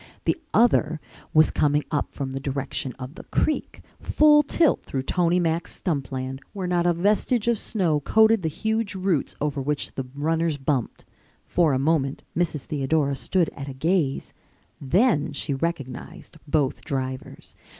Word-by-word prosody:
The - - 0
other 160 -9 +3 0.3
was 155 0 +5
coming 150 0 +2
up 145 - -1
from 135 -1 -4
the 135 - -3
direction 135 -1 -3
of 130 +1 -8
the - - -11
creek, 310 - -1 0.2
full 300 -1 +5
tilt 300 +1 +2
through 135 -1 -4
Tony 175 +4 +2
Mack's 165 -1 -1
stump 140 -8 -2
land, 130 0 -4
where 195 -2 -4
not 175 -1 +1
a 175 - +4
vestige 210 +6 +1
of 235 -3 +2
snow 170 -8 0
coated 220 +7 +4
the 160 - -1
huge 220 +3 -1
roots 185 -6 0
over 145 -2 -1
which 145 +2 -2
the 135 -1 -5
runners 160 +1 0
bumped. 135 -3 -2 0.4
For 170 -4 +2
a - - +2
moment 140 -1 0
Mrs. 160 -5 -1
Theodora 140 0 0
stood 175 +3 +1
at 140 0 -8
a 135 - -7
gaze. 155 -1 0 0.5
Then 155 - +2
she 145 0 -1
recognized 165 +3 -5
both 145 -3 0
drivers. 130 -1 -5
155 Hz, 160 wpm, -24 LUFS, 140-180 Hz, 0.5 s, was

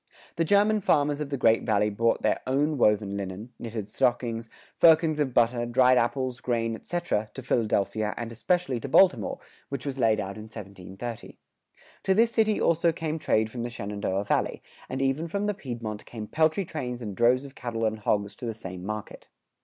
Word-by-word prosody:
The 165 - +1
German 205 +5 +4
farmers 145 -4 +2
of 145 - -3
the 140 - -2
Great 115 -2 +4
Valley 105 -1 +1
brought 115 +3 +1
their - - +2
woven 125 -8 +2
linen, 100 +4 -6
knitted 110 -3 -5
stockings, 115 0 0 0.3
firkins 160 -1 +5
of 140 -3 +1
butter, 120 0 +2
dried 125 +1 +5
apples, 130 +1 -1
grain, 115 -2 0
etc., 115 -4 -2
to 130 - -7
Philadelphia 110 -3 0
and 115 -1 -4
especially 155 +2 0
to 140 - -6
Baltimore, 195 - +4 0.3
which 140 -2 -5
was 135 -1 -4
laid 110 -3 +3
out 100 0 -4
in 110 - -8
1730. 100 +2 -8 0.6
To 190 - +2
this 230 +2 +4
city 220 -2 +2
also 170 0 +3
came 160 -1 -3
trade 110 -6 +1
from 120 - -5
the 120 - -3
Shenandoah 100 -3 -3
Valley, - - 0 0.3
and 135 +1 -2
even 135 +5 0
from 200 +5 -2
the 210 - +1
Piedmont 115 - -6
came 110 -3 -6
peltry 160 - +1
trains 125 -8 -5
and 105 -3 -5
droves 125 +4 +3
of 135 - -11
cattle 115 -3 -3
and 110 0 -1
hogs 105 -1 0
to 120 - -5
the 115 - -3
same 95 -5 -8
market. 110 +1 -6
120 Hz, 185 wpm, -27 LUFS, 110-150 Hz, 0.6 s, firkins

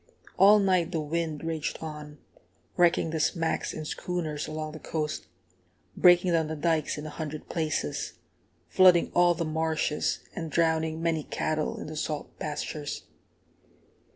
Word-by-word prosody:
All 205 +2 +7
night 185 -4 +2
the 165 - -1
wind 155 0 -2
raged 160 -2 -2
on, 150 -1 -8 0.6
wrecking 170 -2 +3
the 160 - -2
smacks 165 +1 0
and 155 - -6
schooners 160 -5 -3
along 155 0 -4
the 155 - -9
coast, 150 - -3 0.7
breaking 175 0 +6
down 165 -2 +2
the 160 - -3
dikes 155 0 0
in 150 - -6
a 155 - -6
hundred 155 -1 -6
places, 155 - -2 0.5
flooding 180 -2 +5
all 175 0 +5
the 165 0 -2
marshes, 155 -1 0
and 165 -2 -4
drowning 160 0 +1
many 165 -2 +1
cattle 155 +1 -2
in - - -6
the 155 - -7
salt 150 -1 -4
pastures. 150 0 -4
160 Hz, 145 wpm, -28 LUFS, 155-170 Hz, 0.7 s, All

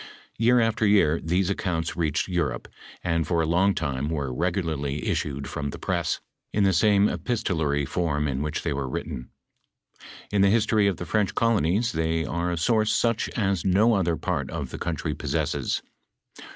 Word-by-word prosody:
"* - - -26
Year 120 +2 +5
after 115 -1 +1
year 90 -6 +4
these 90 +3 +1
accounts 85 -4 -2
reached 75 -4 0
Europe, 90 -2 -2 0.4
and 85 -2 0
for 85 -2 +1
a - - 0
long 90 +5 +2
time 70 -2 -2
were 70 -5 -2
regularly 80 -3 -2
issued 70 -1 -2
from 70 -1 -4
the - - -7
press, - - -1 0.3
in 105 - +1
the 95 -1 +3
same 100 +3 +4
epistolary 80 - -1
form 75 -2 -1
in 65 -1 -2
which 75 0 -3
they - - -1
were 70 -2 -3
written. 65 -2 -5 1.0
In 100 -1 +2
the 100 - +5
history 105 -1 +3
of 95 -4 0
the 90 - -5
French 105 +3 0
colonies, 110 0 +2
they 80 0 0
are 85 +1 -2
a 85 - -2
source 110 +5 +2
Buch 115 -2 +1
as 95 -5 0
no 105 +5 +4
other 90 -5 +1
part - - -2
of - - -5
the - - -6
country 85 -4 -2
possesses. - - -2
85 Hz, 180 wpm, -25 LUFS, 75-100 Hz, 1.0 s, Year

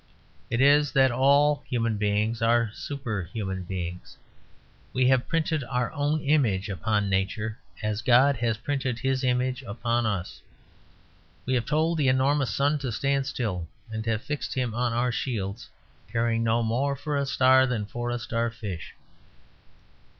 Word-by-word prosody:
It 115 - 0
is 145 +1 +5
that 135 -2 +5
all 140 +4 +3
human 115 -3 0
beings 105 +2 0
are 115 -1 +3
superhuman 100 - -4
beings. 90 -1 -6 0.8
We 130 0 +3
have 130 -1 +2
printed 160 -3 0
our 125 -1 -1
own 150 +1 0
image 120 -10 +1
upon 105 +1 0
Nature, 100 +3 -1 0.2
as 105 0 -1
God 130 +3 +5
has 115 -1 0
printed 130 -1 -2
His 135 +1 -1
image 125 +1 0
upon 120 0 -1
us. 95 -4 -3 1.0
We 130 - 0
have 120 -3 0
told 160 +2 +1
the 140 - +2
enormous 135 +1 +2
sun 145 +7 +1
to 135 -3 -3
stand 135 +5 0
still; 90 -9 -3 0.3
we 110 - -2
have 115 -1 -1
fixed 145 -1 -4
him 125 -4 -1
on 120 +1 0
our 120 +2 +1
shields, 115 -2 -3 0.4
caring 115 0 +1
no 115 +1 +2
more 130 +5 0
for 145 +2 -3
a 140 -1 0
star 130 0 +5
than 115 -5 -2
for 120 +3 -4
a 120 - -1
starfish. 115 -6 -4
120 Hz, 150 wpm, -26 LUFS, 110-135 Hz, 1.0 s, is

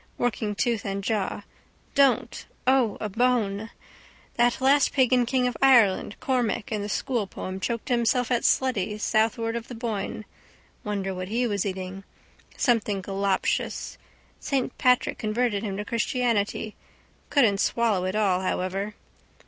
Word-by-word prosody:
Working 215 -3 -1
tooth 230 -1 0
and 195 0 -3
jaw. 205 -1 -1 0.5
Don't! 275 -2 +2 0.2
O! 255 -5 +3
A 215 - -2
bone! 220 -2 0 0.6
That 240 0 +2
last 275 +2 +4
pagan 255 -2 +3
king 255 0 +1
of 250 - -1
Ireland 235 -7 +4
Cormac 245 -6 -1
in 215 -2 -1
the 205 - -4
schoolpoem 200 -6 -3
choked 230 +2 -3
himself 245 0 +1
at 240 - +2
Sletty 215 -5 +1
southward 225 +1 +1
of 235 0 -5
the 245 - -8
Boyne. 215 -2 -4 0.6
Wonder 200 -2 -2
what 185 0 -5
he 235 +5 0
was 205 -3 -1
eating. 190 0 -5 0.5
Something 215 -5 +1
galoptious. 195 0 -1 0.4
Saint 265 -3 -1
Patrick 250 -1 +2
converted 215 -1 0
him 200 -3 -4
to 210 - -4
Christianity. 230 -3 -1 0.5
Couldn't 225 -9 +3
swallow 215 -6 +1
it 185 +2 -2
all 195 -4 +2
however. 190 +2 -2
220 Hz, 135 wpm, -26 LUFS, 200-245 Hz, 0.6 s, last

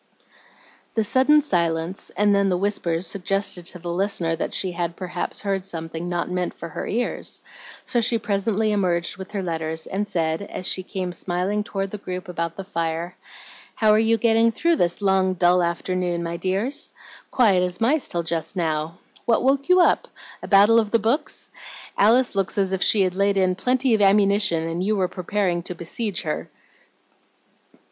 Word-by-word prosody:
The 220 - +2
sudden 265 +7 +4
silence 170 - -1
and 205 0 +4
then 200 0 +3
the 180 - +1
whispers 180 -3 0
suggested 195 -1 -1
to - - -6
the 175 0 -5
listener 175 -3 0
that 165 - -3
she 185 - -1
had 170 -1 -3
perhaps 180 -1 -4
heard 195 -2 -1
something 165 -2 -6
not 175 -1 -1
meant 180 -1 -2
for 170 - -8
her - - -5
ears; 240 +3 -1 0.5
so 240 - +1
she 230 +1 +1
presently 215 0 0
emerged 180 -3 0
with 190 0 -8
her 200 -2 -2
letters, 160 -2 -3
and 205 +2 -3
said, 160 -2 -1
as 200 -2 -6
she 185 - +1
came 185 -1 -4
smiling 185 +4 -1
toward 195 -1 -4
the 210 - -6
group 180 -2 -6
about 170 -2 -3
the 195 - -6
fire, 170 -1 -3 0.6
"How 215 -1 +3
are 215 - +5
you 225 +1 +3
getting 230 0 +3
through 335 +8 +1
this 175 0 0
long, 190 -1 +2
dull 180 0 +4
afternoon, 175 0 -1
my 170 0 -3
dears? 200 - -2 0.4
Quiet 205 -8 +4
as 180 0 -2
mice 265 +6 +2
till 170 -1 -2
just 165 +2 -3
now. 160 -1 -2 0.3
What 230 - +2
woke 275 +3 +1
you 365 0 +6
up? - - +3 0.3
A - - -7
battle 205 +3 +6
of 215 -2 -1
the 230 - +3
books? 230 +7 -1 0.4
Alice 235 +5 +4
looks 195 -1 -1
as 195 -1 +1
if 190 - -1
she 210 - +4
had 185 -1 0
laid 200 +1 +1
in 185 -1 +3
plenty 250 +5 +1
of 215 - +2
ammunition, 195 -4 +3
and 165 +2 -2
you 215 +2 +1
were 190 -2 +1
preparing 180 -1 -1
to 180 +1 -6
besiege 185 +4 -3
her." 155 - -3
190 Hz, 185 wpm, -23 LUFS, 175-210 Hz, 0.6 s, you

